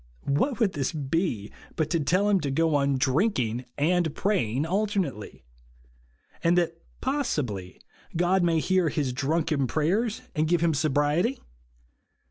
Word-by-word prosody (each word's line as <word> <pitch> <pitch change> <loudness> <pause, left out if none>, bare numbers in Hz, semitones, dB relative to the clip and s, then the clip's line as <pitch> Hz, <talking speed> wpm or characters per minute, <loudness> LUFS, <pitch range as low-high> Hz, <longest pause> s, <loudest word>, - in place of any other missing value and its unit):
What 235 - 0
would 210 -5 +2
this 140 0 -1
be 145 - -2 0.2
but 155 - -1
to 170 - +2
tell 180 +8 +2
him 205 -2 +3
to 145 - -2
go 160 +3 +1
on 140 -1 +2
drinking 130 - +1
and 165 +1 +1
praying 150 - 0
alternately; 180 - -2 1.0
and 170 +1 +3
that, 170 -1 0 0.2
possibly, 145 - -2 0.4
God 180 +2 +3
may 170 -2 +2
hear 185 0 +2
his 140 -5 -1
drunken 150 +1 0
prayers, 200 - 0
and 155 +1 +1
give 170 0 +2
him 170 -1 +3
sobriety 155 - +1
160 Hz, 135 wpm, -26 LUFS, 140-185 Hz, 1.0 s, him